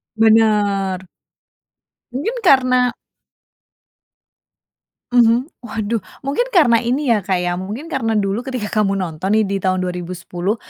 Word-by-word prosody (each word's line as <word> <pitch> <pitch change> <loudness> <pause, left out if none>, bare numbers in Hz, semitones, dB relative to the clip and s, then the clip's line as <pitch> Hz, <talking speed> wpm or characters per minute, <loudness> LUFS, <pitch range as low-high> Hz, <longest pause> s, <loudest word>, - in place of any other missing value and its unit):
Bener. 205 -4 +2 1.0
Mungkin 335 - -3
karna 255 -5 +4 2.2
mhm, 240 +1 +4 0.2
waduh 225 -1 -3 0.2
mungkin 285 - 0
karena 265 - +4
ini 250 +2 0
ya 215 - +2
Kak 190 -3 +1
ya 175 0 -1
mungkin 210 - -6
karena 225 -5 -1
dulu 195 +1 0
ketika 250 -6 -4
kamu 195 -1 +1
nonton 180 0 -3
nih 220 -1 +3
di 200 0 -1
tahun 185 -1 0
2010, 180 +2 -3
220 Hz, 120 wpm, -19 LUFS, 190-250 Hz, 2.2 s, karna